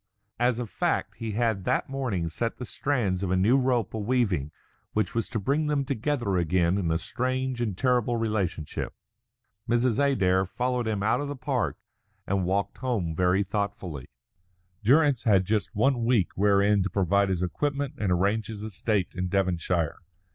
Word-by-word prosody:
As 120 -1 +2
a 120 - -2
fact 105 - -1
he 115 -2 -4
had 110 -3 0
that 125 - +1
morning 125 -11 -2
set 115 +8 -3
the 125 - -5
strands 110 -10 -1
of 95 - -1
a 95 - +2
new 100 +7 +4
rope 125 -5 +1
a 110 - -3
weaving 100 - 0 0.4
which 110 - 0
was 115 -2 -1
to 115 - -2
bring 145 +9 0
them 145 -2 0
together 125 -6 -1
again 85 +2 +2
in 85 -4 -1
a 80 - +2
strange 130 +4 -2
and 105 -6 -2
terrible 125 -1 +2
relationship. 100 -9 -2 0.7
Mrs. 120 +1 +2
Adair 95 -9 +2
followed 125 +2 -1
him 105 -3 -1
out 110 - +2
of 145 - -3
the 145 - -4
park, 130 - -1 0.5
and 95 -1 0
walked 95 +2 -1
home 115 -11 -1
very 90 +3 +2
thoughtfully. 95 - -4 0.8
Durrance 140 +2 +4
had 95 -4 +4
just 105 0 -1
one 120 +2 +2
week 115 -6 +2
wherein 100 +1 +3
to 95 - -1
provide 100 +1 +2
his 90 -1 0
equipment 140 - -2
and 100 -4 0
arrange 100 +5 +1
his 105 -2 -6
estate 105 -2 -1
in 90 0 -2
Devonshire. 90 -4 0
105 Hz, 170 wpm, -27 LUFS, 95-125 Hz, 0.8 s, new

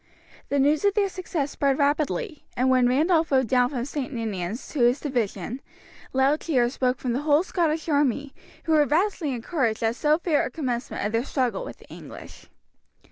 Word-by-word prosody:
The 285 - +1
news 290 +4 +3
of 405 -1 +2
their 405 -2 +2
success 340 -6 -3
spread 275 -1 +1
rapidly, 300 - 0
and 255 +2 +3
when 250 -1 +4
Randolph 320 +5 +2
rode 260 -1 +3
down 250 +1 +3
from 250 -4 -3
St. 280 -2 -4
Ninians 220 -3 -4
to 300 - -5
his 245 +3 +4
division, 240 - -3 0.5
loud 270 +3 +2
cheers 250 -5 0
broke 255 -1 +1
from 250 -2 -2
the 260 - -1
whole 300 +2 +3
Scottish 325 -4 -1
army, 285 -2 +1 0.3
who 325 - -2
were 305 -2 +5
vastly 330 -1 +1
encouraged 235 -2 -1
at 225 +1 +1
so 300 +4 +2
fair 330 -3 +1
a - - -3
commencement 245 -6 -3
of 210 - -1
their 230 +1 0
struggle 250 -7 -1
with - - -8
the - - -19
English. - - -11
275 Hz, 190 wpm, -25 LUFS, 245-305 Hz, 0.5 s, were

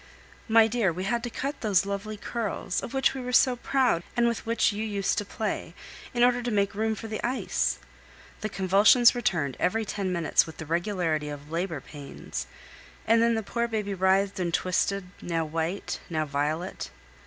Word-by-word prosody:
My 225 -1 +6
dear, 220 -4 +1
we 180 +3 -4
had 235 +5 0
to - - -3
cut 275 +5 -4
those 200 -4 +3
lovely 200 +2 -4
curls, 210 -4 -3
of - - -6
which 270 -1 +2
we 265 - -5
were 250 0 -4
so 250 0 +5
proud 250 -7 +1 0.2
and 240 0 +4
with 235 -1 -2
which 230 -1 +2
you 210 +1 -3
used 205 -3 0
to 205 - -4
play, 200 -5 -4 0.4
in 240 0 +2
order 245 0 +4
to 240 - -2
make 200 -2 +1
room 220 +1 0
for 225 - -7
the 215 0 -5
ice. 250 +2 0 0.6
The 215 - -3
convulsions 200 +6 +5
returned 175 - -1
every 220 +4 +1
ten 195 -2 -2
minutes 170 -3 +2
with 160 - -10
the 160 - -6
regularity 165 -2 -1
of 145 +1 -8
labor 165 -3 -2
pains, 145 0 -7 0.6
and 230 +1 +4
then 230 0 +3
the 220 - -1
poor 235 +3 -1
baby 210 -3 -2
writhed 190 +1 +2
and 175 -2 0
twisted, 185 +3 0 0.2
now 165 -2 -1
white, 165 +5 -3
now 155 -2 0
violet. 150 +5 -2
200 Hz, 190 wpm, -27 LUFS, 175-230 Hz, 0.6 s, My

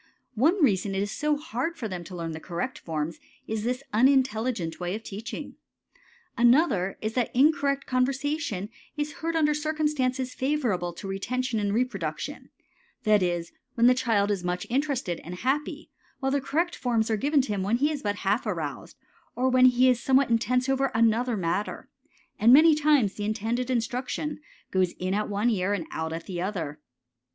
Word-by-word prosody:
One 305 - +3
reason 195 -5 +2
it 195 - 0
is 205 - -4
so 300 0 0
hard 300 +3 -3
for 225 - -3
them 180 -3 -5
to 185 - -9
learn 165 -1 -4
the 160 - -6
correct 180 +11 -4
forms 160 0 -4 0.3
is 220 -1 -3
this 250 +3 -2
unintelligent 235 -6 +2
way 180 +2 -2
of 220 - -7
teaching. 215 +3 -7 0.8
Another 235 - +3
is 215 +1 -2
that 245 -2 0
the - - -7
incorrect 280 -1 +3
conversation 260 - -1 0.3
is 295 0 -2
heard 330 +1 -1
under 300 -2 +3
circumstances 295 -4 -1
favorable 245 -11 -1
to 195 - -8
retention 240 +5 -2
and 205 -1 0
reproduction; 210 - -3 0.5
that 215 -2 +4
is, 175 -2 -1 0.2
when 235 - +3
the 250 - +7
child 225 -5 +1
is 195 -3 -2
much 180 0 -2
interested 265 - -1
and 175 +2 -7
happy; 290 - -2 0.3
while 270 -1 0
the 280 0 +1
correct 330 +6 -1
forms 230 -3 0
are - - +3
given 280 +5 +2
him 205 -6 -2
when 205 +5 +1
he 290 +4 +2
is 295 -2 -4
but 205 -1 -1
half 205 +5 +1
aroused, - - -4 0.4
or 260 +1 +1
when 255 0 +5
he 250 +1 +4
is 250 -2 +3
somewhat 265 -1 +3
intense 250 +3 +2
over 270 0 +2
another 230 +1 +2
matter, 185 +3 -2 0.5
and 230 +3 +6
many 310 +4 +8
times 295 -9 +3
the 205 - -5
intended 225 +4 -1
instruction 255 +5 -2 0.3
goes 185 -2 +1
in 185 +1 -3
at 210 +1 -1
one 205 +4 +1
ear 195 -1 0
and 180 -5 -2
out 160 0 -3
at 165 0 -5
the 175 -2 -4
other. 165 -6 -3
235 Hz, 180 wpm, -27 LUFS, 195-270 Hz, 0.8 s, many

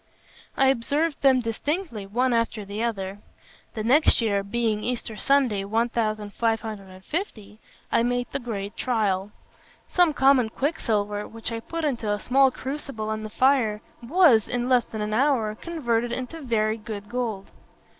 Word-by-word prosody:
I 270 0 +5
observed 285 +5 0
them 265 -2 +5
distinctly, 235 - -3
one 245 +5 +1
after 230 -2 0
the 200 +2 -5
other; 200 -4 -3 0.6
and 215 -1 -3
next 295 +6 +5
year, 205 -4 +1
being 215 +1 -1
Easter 235 -2 -3
Sunday, 255 -5 +2
1550, 215 - -2 0.3
I - - +3
made 245 +1 0
the 275 - -2
great 210 -4 -5
trial. 205 -5 0 0.6
Some 355 -3 +3
common 265 -4 +4
quicksilver, 210 -7 -1
which 225 +1 -7
I 230 - -3
put 330 +7 -4
into 235 -7 -1
a 205 - +1
small 265 +5 +4
crucible 260 -5 -5
on 215 0 -3
the 215 - -6
fire, 240 -3 +2 0.2
was, 260 - +4
in 245 0 -1
less 250 -2 +3
than 220 - -6
an 210 0 -2
hour, 240 -3 +2
converted 240 -4 -2
into 255 +7 -5
very 220 -4 0
good 210 -2 -7
gold. 230 -5 -3
230 Hz, 145 wpm, -25 LUFS, 215-265 Hz, 0.6 s, I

